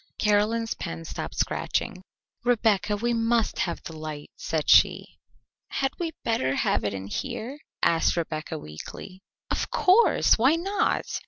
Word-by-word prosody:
Caroline's 215 +2 +2
pen 80 0 -6
stopped - - -6
scratching. 185 - -1 0.4
"Rebecca, 215 -4 +2
we 240 +3 0
must 230 0 +1
have 170 - -2
the 160 - -8
light," 155 -2 -7
said 155 -2 -2
she. - - +5 0.6
"Had 270 0 -1
we 335 -2 -2
better 135 - 0
have - - +1
it 100 -1 -1
in 95 0 -6
here?" 245 - -5 0.2
asked 165 +1 +3
Rebecca 160 -1 -3
weakly. 155 - -9 0.3
"Of - - -1
course! 380 - +4
Why 265 +7 +5
not?" 390 +5 0
210 Hz, 140 wpm, -26 LUFS, 155-240 Hz, 0.6 s, she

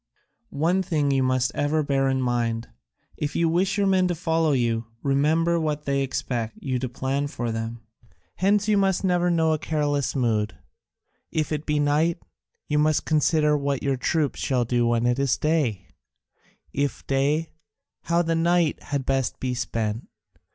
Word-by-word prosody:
One 170 +6 +2
thing 150 -6 0
you 135 -1 +2
must 130 0 +1
ever 150 +2 0
bear 135 -1 +1
in 130 -1 0
mind: 115 -2 -1 0.5
if 145 - -3
you 170 - +2
wish 185 +5 +1
your 200 - +2
men 190 -1 +3
to 175 - -1
follow 165 -1 +1
you, 115 -3 0 0.2
remember 160 +5 +2
that 150 -2 -2
they 140 0 +1
expect 120 -4 -3
you 130 -2 -2
to 130 0 -3
plan 135 +3 -2
for 120 -5 -3
them. 115 +1 -4 0.6
Hence 205 +2 +2
you 210 -1 +3
must 195 -1 +1
never 180 -1 +2
know 160 -2 +2
a 155 - -1
careless 145 -3 -1
mood; 110 -5 0 0.7
if 155 -1 -2
it 150 0 -3
be 150 -1 +1
night, 150 +3 +2 0.5
you 150 0 +1
must 155 0 +2
consider 150 -1 +2
what 140 -2 -1
your 140 -1 +1
troops 145 +3 -1
shall 125 -3 0
do 120 0 +1
when 120 0 +1
it 120 +2 +1
is 140 -2 +1
day; 140 - 0 0.9
if 140 0 -2
day, 145 +4 0 0.5
how 170 +1 +2
the 165 0 0
night 170 -1 +2
had 140 -2 -3
best 135 -2 -1
be 130 -1 -2
spent. 115 -2 -3
145 Hz, 170 wpm, -24 LUFS, 125-160 Hz, 0.9 s, men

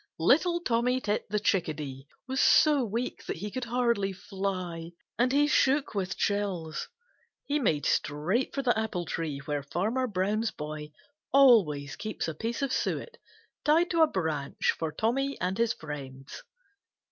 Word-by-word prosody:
Little 330 - +3
Tommy 250 -2 +1
Tit 210 -4 -2
the 210 +1 +1
Chickadee 150 -9 -1 0.2
was 265 +1 -2
so 295 -4 +5
weak 230 +3 -3
that - - -2
he 205 +5 -5
could 255 +1 -3
hardly 235 -4 +1
fly, 185 -4 -4 0.3
and 250 +1 +3
he 290 +2 +4
shook 280 -2 +2
with 190 -2 -2
chills. 190 -7 -1 0.6
He 290 +1 0
made 160 - +1
straight 175 - 0
for 275 - -1
the 245 -2 +3
apple 215 -5 -2
tree 155 -2 -3
where 145 -1 -1
Farmer 210 - -1
Brown's 210 +2 0
boy 150 0 -7 0.4
always 195 - +5
keeps 215 -4 -4
a 160 - -2
piece 230 - -3
of 270 -1 0
suet 480 0 -2 0.5
tied 330 +4 +3
to 335 -2 +3
a 320 - +7
branch 160 - -1
for 160 -1 -3
Tommy 270 - -1
and 185 +4 -2
his 230 -1 +3
friends. 135 -3 -8
205 Hz, 155 wpm, -29 LUFS, 160-255 Hz, 0.6 s, a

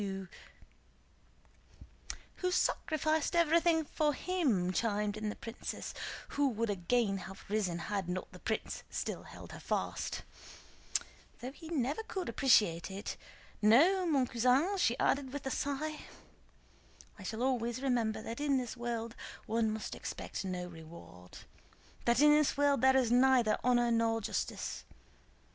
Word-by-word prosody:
"Who 365 - 0
sacrificed 315 -3 +1
everything 335 -1 +4
for 295 -1 0
him," 255 - +1
chimed 210 -1 0
in 215 0 -3
the - - -4
princess, 230 +1 -6 0.4
who 285 -1 +2
would 230 -2 -1
again 200 +2 +1
have 190 +1 -10
risen 200 -5 0
had 190 +1 -3
not 185 +1 -4
the - - -12
prince - - -3
still - - -3
held - - -11
her - - -8
fast, - - -2 1.2
"though 250 +2 -5
he 320 +3 -11
never 290 - 0
could 380 -5 -4
appreciate 210 - +3
it. 195 +2 -5 0.5
No, 330 - +5
mon 280 -5 +3
cousin," 255 - +2
she 240 -8 +2
added 275 -2 +1
with 285 0 -6
a 265 - -1
sigh, 300 +3 -2 1.2
"I - - -9
shall 220 +5 -3
always 250 -1 0
remember 225 -4 0
that 230 +3 -5
in 285 -2 +2
this 250 -2 -3
world 235 -1 -4 0.3
one 225 0 +1
must 215 0 -4
expect - - -5
no 180 -2 -3
reward, 160 - -12 0.7
that 235 +2 +4
in 295 0 +8
this 300 -2 +3
world 285 -3 +3
there 265 0 +6
is 245 -3 +2
neither 250 -3 +4
honor 240 -1 +3
nor 230 0 +2
justice. 220 - -3
240 Hz, 140 wpm, -33 LUFS, 215-285 Hz, 1.2 s, in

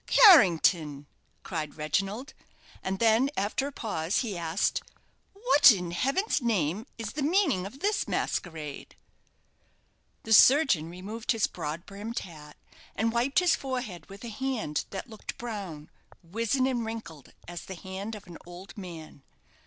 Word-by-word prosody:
"Carrington!" 170 - +6 0.4
cried 155 -4 -4
Reginald; 195 - -2 0.5
and 190 0 -2
then, 230 +5 +3
after 210 +8 0
a - - -6
pause, 190 - -1
he 220 -6 -3
asked, 170 +1 0 0.5
"What, 385 - +6
in 180 -5 -2
heaven's 275 - 0
name, 210 - 0
is 225 -2 -5
the 295 - -3
meaning 290 - +2
of 265 +7 -13
this 410 +1 0
masquerade?" 155 -5 -4 1.3
The 220 - +1
surgeon 250 - +6
removed 205 +7 -3
his 225 -2 +2
broad 155 +4 -5
brimmed 210 +4 -7
hat, 150 -4 -8 0.4
and 225 +2 0
wiped 245 +4 0
his 360 -3 +5
forehead 250 - -5
with 195 +3 -11
a 235 - -5
hand 225 - -2
that 195 - -6
looked 220 -3 -8
brown, 195 -10 -6 0.4
wizen, 230 +9 0
and 250 -3 0
wrinkled 220 - -8
as 175 0 -7
the 190 - -7
hand 190 +4 -6
of 205 - -11
an 175 -3 -11
old 175 +2 -11
man. 165 -7 -9
205 Hz, 145 wpm, -28 LUFS, 170-250 Hz, 1.3 s, Carrington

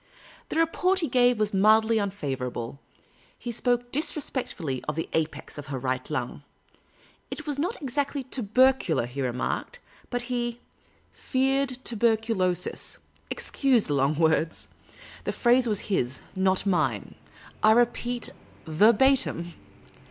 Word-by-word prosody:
The - - -4
report 360 +4 +2
he 325 - 0
gave 245 -1 +4
was 215 -1 0
mildly 220 +3 +4
unfavourable. 135 - -4 0.6
He 240 - -5
spoke 245 +1 0
disrespectfully 260 - -2
of 150 - -1
the 165 - -2
apex 160 -1 -2
of 145 - -8
her 140 -1 -3
right 130 0 -2
lung. - - -3 0.9
It - - -6
was 290 -2 -3
not 360 +10 -1
exactly 280 +1 -1
tubercular, 250 - +2
he 125 +3 -5
remarked, 125 - -2 0.3
but 245 -1 -2
he 240 -1 -2 0.5
"feared 265 0 0
tuberculosis" 220 -6 0 0.2
— - - -29
excuse 260 -6 +2
the 145 - -1
long 140 +2 +2
words; 160 0 +1 0.5
the - - -1
phrase 245 0 +3
was 210 -3 0
his, 130 - -1
not 190 0 +2
mine; 155 - 0 0.5
I 215 - +6
repeat 240 +1 +1 0.3
verbatim. 210 - +3
220 Hz, 125 wpm, -26 LUFS, 160-255 Hz, 0.9 s, I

